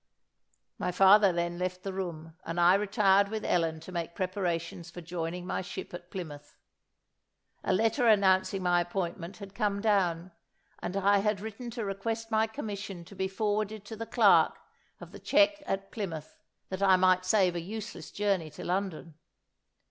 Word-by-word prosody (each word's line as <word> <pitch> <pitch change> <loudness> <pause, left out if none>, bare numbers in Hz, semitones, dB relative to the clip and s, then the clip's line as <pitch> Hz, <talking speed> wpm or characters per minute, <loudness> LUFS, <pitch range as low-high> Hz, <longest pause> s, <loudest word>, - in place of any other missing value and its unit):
My - - -1
father 195 +2 +6
then 170 0 -2
left 185 0 -3
the 195 - -4
room, 165 -4 -5
and 165 +1 -4
I 175 +1 +6
retired 200 -1 +3
with 215 0 -4
Ellen 165 -2 +1
to 175 - -10
make 170 -1 -4
preparations 175 -3 -3
for 175 - -9
joining 175 +1 -4
my - - -2
ship 190 0 -7
at 175 0 -9
Plymouth. 150 -6 -8 1.1
A - - 0
letter 225 +6 +2
announcing 190 -2 +3
my 175 -1 +3
appointment 175 +1 -4
had 200 -2 -10
come 200 0 0
down, 185 -5 +1 0.5
and 190 - -4
I 200 +1 +4
had 210 0 0
written 220 +4 -7
to 225 - -2
request 225 +3 -3
my 220 0 +3
commission 205 -7 -6
to 200 - -13
be 190 0 -1
forwarded 210 +1 -2
to 220 - -7
the 225 +1 -6
clerk - - +5 0.4
of - - -11
the - - -10
cheque 305 +1 +3
at 195 0 -3
Plymouth, 165 -8 -5 0.3
that 190 0 -4
I 190 -1 +6
might 185 0 +4
save 185 -2 +3
a 170 - -2
useless 215 +5 -7
journey 195 -6 0
to - - -10
London. 180 -3 -2
190 Hz, 170 wpm, -29 LUFS, 175-205 Hz, 1.1 s, father